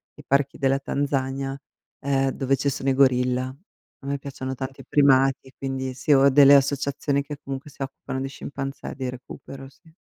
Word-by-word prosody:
i -, -, -14 dB
parchi 140 Hz, 0 st, +1 dB
della 135 Hz, 0 st, +1 dB
Tanzania, 135 Hz, -1 st, -2 dB, 0.4 s
ehm, 135 Hz, -1 st, +1 dB
dove 135 Hz, +1 st, 0 dB
ci 145 Hz, -, -2 dB
sono 135 Hz, 0 st, -2 dB
i -, -, +3 dB
gorilla. 130 Hz, -1 st, +2 dB, 0.5 s
A -, -, -11 dB
me 140 Hz, 0 st, -1 dB
piacciono 130 Hz, -1 st, -6 dB
tanti 135 Hz, +1 st, -6 dB
i -, -, -17 dB
primati, 135 Hz, -2 st, +3 dB
e 130 Hz, -, -16 dB
quindi 130 Hz, -1 st, -3 dB
sì, 130 Hz, +4 st, -2 dB
ho 140 Hz, -1 st, +6 dB
delle 140 Hz, +1 st, +8 dB
associazioni 140 Hz, 0 st, +1 dB
che 145 Hz, 0 st, -7 dB
comunque 135 Hz, +1 st, -6 dB
si 140 Hz, -, -16 dB
occupano 135 Hz, 0 st, -5 dB
di 135 Hz, -, -3 dB
scimpanzé 135 Hz, 0 st, -6 dB
di 130 Hz, -2 st, -3 dB
recupero, 135 Hz, +2 st, -10 dB
sì. 160 Hz, +4 st, -23 dB
135 Hz, 185 wpm, -24 LUFS, 130-140 Hz, 0.5 s, delle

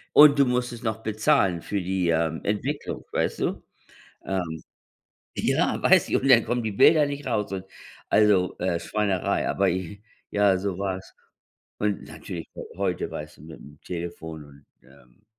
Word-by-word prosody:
Und 145 Hz, -1 st, +8 dB
du 140 Hz, -, +6 dB
musstest 125 Hz, -2 st, -2 dB
noch 110 Hz, -1 st, -3 dB
bezahlen 105 Hz, -5 st, +2 dB
für 100 Hz, +2 st, -3 dB
die, 90 Hz, -1 st, -1 dB
ähm, 80 Hz, -1 st, 0 dB
Entwicklung, 125 Hz, +8 st, -3 dB
weißt -, -, -1 dB
du? -, -, -2 dB, 0.6 s
Ähm, 90 Hz, -4 st, -3 dB, 0.8 s
ja, -, -, +1 dB
weiß -, -, +4 dB
ich -, -, +1 dB
und 135 Hz, -, 0 dB
dann 120 Hz, -4 st, +6 dB
kommen 120 Hz, 0 st, -1 dB
die 110 Hz, -, -2 dB
Bilder 150 Hz, +9 st, +5 dB
nicht 145 Hz, 0 st, -5 dB
raus 105 Hz, -5 st, -1 dB
und 95 Hz, -1 st, -4 dB, 0.5 s
also, 100 Hz, -4 st, +3 dB
äh, 85 Hz, -1 st, 0 dB
Schweinerei. 100 Hz, +1 st, -1 dB
Aber, -, -, +2 dB
i 90 Hz, +1 st, -3 dB
ich 100 Hz, -, -16 dB, 0.3 s
ja, 100 Hz, -2 st, +3 dB
so 95 Hz, -1 st, -3 dB
war 95 Hz, -1 st, -2 dB
es. 95 Hz, -, -15 dB, 0.6 s
Und, 105 Hz, -1 st, -1 dB
natürlich 85 Hz, -3 st, -8 dB
heu -, -, -6 dB
heute 95 Hz, -2 st, -2 dB
weißt 75 Hz, +3 st, -8 dB
du -, -, -16 dB
mit 80 Hz, 0 st, -11 dB
dem 75 Hz, +1 st, -15 dB
Telefon 85 Hz, -3 st, -6 dB
und, 70 Hz, -1 st, -18 dB, 0.2 s
ähm 65 Hz, +5 st, -22 dB
95 Hz, 170 wpm, -25 LUFS, 85-110 Hz, 0.8 s, Und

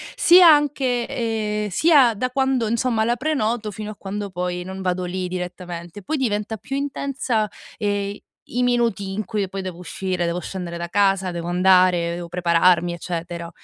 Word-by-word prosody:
sia 350 Hz, 0 st, +7 dB
anche 270 Hz, -5 st, +1 dB
ehm, 210 Hz, -2 st, -2 dB
sia 275 Hz, -, +5 dB
da 255 Hz, +5 st, -1 dB
quando 265 Hz, -3 st, +1 dB
insomma 230 Hz, 0 st, +1 dB
la 240 Hz, +1 st, +1 dB
prenoto, 235 Hz, -6 st, -1 dB
fino 215 Hz, +2 st, -6 dB
a -, -, -10 dB
quando 200 Hz, +1 st, -5 dB
poi 180 Hz, 0 st, -3 dB
non 190 Hz, +1 st, -7 dB
vado 180 Hz, -1 st, -1 dB
lì 185 Hz, 0 st, -3 dB
direttamente, 180 Hz, 0 st, -6 dB
poi 310 Hz, +10 st, -2 dB
diventa 215 Hz, -3 st, -1 dB
più 270 Hz, +7 st, -6 dB
intensa, 270 Hz, -5 st, -1 dB, 0.3 s
ehm, 205 Hz, -1 st, -2 dB, 0.3 s
i 245 Hz, -, -2 dB
minuti 230 Hz, -6 st, 0 dB
in 215 Hz, +2 st, -2 dB
cui 200 Hz, 0 st, -2 dB
poi 195 Hz, +1 st, -5 dB
devo 185 Hz, -2 st, -6 dB
uscire, 180 Hz, 0 st, -3 dB
devo 170 Hz, +1 st, -1 dB
scendere 175 Hz, -3 st, -5 dB
da 170 Hz, 0 st, -5 dB
casa, 195 Hz, -2 st, +2 dB
devo 170 Hz, 0 st, -5 dB
andare, 180 Hz, -1 st, +3 dB
devo 175 Hz, -1 st, -6 dB
prepararmi, 175 Hz, 0 st, +3 dB
eccetera, 170 Hz, 0 st, -5 dB
200 Hz, 165 wpm, -22 LUFS, 180-235 Hz, 0.3 s, sia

